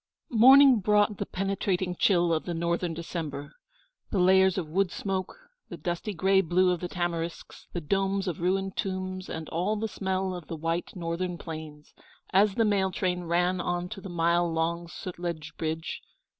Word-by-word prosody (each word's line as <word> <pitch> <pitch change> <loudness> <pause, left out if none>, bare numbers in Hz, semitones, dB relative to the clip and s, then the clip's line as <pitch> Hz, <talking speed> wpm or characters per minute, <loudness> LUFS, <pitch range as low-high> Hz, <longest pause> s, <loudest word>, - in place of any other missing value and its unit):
Morning 260 +2 +8
brought 210 +1 +3
the - - -2
penetrating 190 -1 -1
chill 175 -3 +3
of 160 - -1
the 175 - -3
Northern 170 +1 -1
December, 155 -4 -5 0.6
the 205 - -1
layers 190 +1 +5
of 175 -4 -2
wood 185 +4 +1
smoke, 190 - -3 0.3
the - - -7
dusty 175 +4 -3
gray 190 +1 +3
blue 180 +1 +3
of 180 - -1
the 180 - -3
tamarisks, 170 -2 -4
the 175 - -4
domes 195 +4 0
of 170 -2 -3
ruined 190 +2 0
tombs, 185 -1 -3
and 160 -1 -5
all 180 +6 0
the 220 +1 -2
smell 190 -2 -2
of 175 -3 -8
the 165 - -5
white 165 +4 -2
Northern 175 0 -3
plains, 155 -3 -9 0.4
as 195 +1 +4
the 225 - +3
mail 200 -2 +2
train 180 -1 -2
ran 175 +2 +1
on 175 0 -2
to 195 -1 -7
the 190 - -8
mile 170 0 +2
long 170 +1 -1
Sutlej 170 -3 -6
Bridge. 160 +1 -3
180 Hz, 170 wpm, -28 LUFS, 170-195 Hz, 0.6 s, Morning